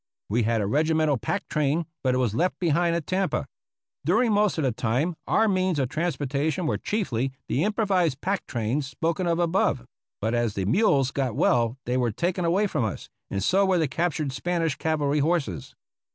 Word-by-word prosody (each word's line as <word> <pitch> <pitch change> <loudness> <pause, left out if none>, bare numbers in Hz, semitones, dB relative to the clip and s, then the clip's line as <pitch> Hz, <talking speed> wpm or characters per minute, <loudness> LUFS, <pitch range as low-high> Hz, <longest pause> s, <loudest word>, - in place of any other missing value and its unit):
We 115 +4 +1
had 115 0 +1
a - - 0
regimental 155 +3 +2
pack 195 - -3
train, 150 +2 0 0.2
but 130 -1 +2
it - - +1
was 125 -5 +1
left 175 +10 0
behind 170 0 +1
at 170 -3 -2
Tampa. 190 +1 0 0.6
During 245 -2 +2
most 205 -2 +2
of 160 - 0
the 130 - +2
time 125 +10 -1
our 220 - +3
means 185 -4 +1
of 130 -3 0
transportation 155 0 -1
were - - 0
chiefly 135 - -1
the 140 - 0
improvised 190 - +1
pack 195 +3 -2
trains 120 +5 -1
spoken 165 +6 -1
of 170 -1 +1
above; 170 -7 +1 0.3
but 110 +3 -1
as 120 -3 0
the 95 - -1
mules 140 - +3
got 130 -5 -1
well 120 +1 +2
they 125 +1 0
were 120 -2 +1
taken 175 - -1
away 185 +5 +2
from 155 - -1
us, 110 - -4 0.2
and 100 - -2
so 195 +2 +3
were 190 -2 +3
the 160 -3 +2
captured 155 -1 -1
Spanish 165 +1 -1
cavalry 150 -2 0
horses. 140 - -1
155 Hz, 190 wpm, -25 LUFS, 125-175 Hz, 0.6 s, our